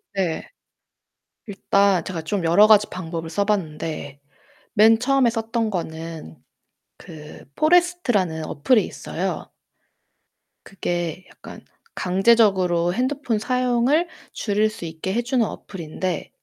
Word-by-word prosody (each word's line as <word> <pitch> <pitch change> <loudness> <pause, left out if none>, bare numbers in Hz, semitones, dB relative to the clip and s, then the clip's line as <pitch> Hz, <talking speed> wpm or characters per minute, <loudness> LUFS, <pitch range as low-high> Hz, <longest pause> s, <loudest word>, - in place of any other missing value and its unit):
네. 180 -4 -2 1.0
일단 200 -2 +1
제가 170 -3 -5
좀 180 +3 -2
여러 175 +6 +6
가지 210 -1 +6
방법을 165 -2 -6
써 200 +5 0
봤는데 155 -7 -3 0.5
맨 220 +1 +5
처음에 265 -1 +3
썼던 225 0 -2
거는 160 - -6 0.6
그 150 -2 -12
포레스트라는 305 - +2
어플이 215 - +2
있어요. - - -5 1.2
그게 175 -2 -4
약간 - - -12 0.3
강제적으로 185 -3 +3
핸드폰 255 -2 -1
사용을 255 +7 +1 0.3
줄일 210 0 0
수 215 -5 -8
있게 160 +4 -5
해 240 - +1
주는 240 -1 +1
어플인데 180 -2 -5
200 Hz, 235 characters per minute, -22 LUFS, 165-230 Hz, 1.2 s, 여러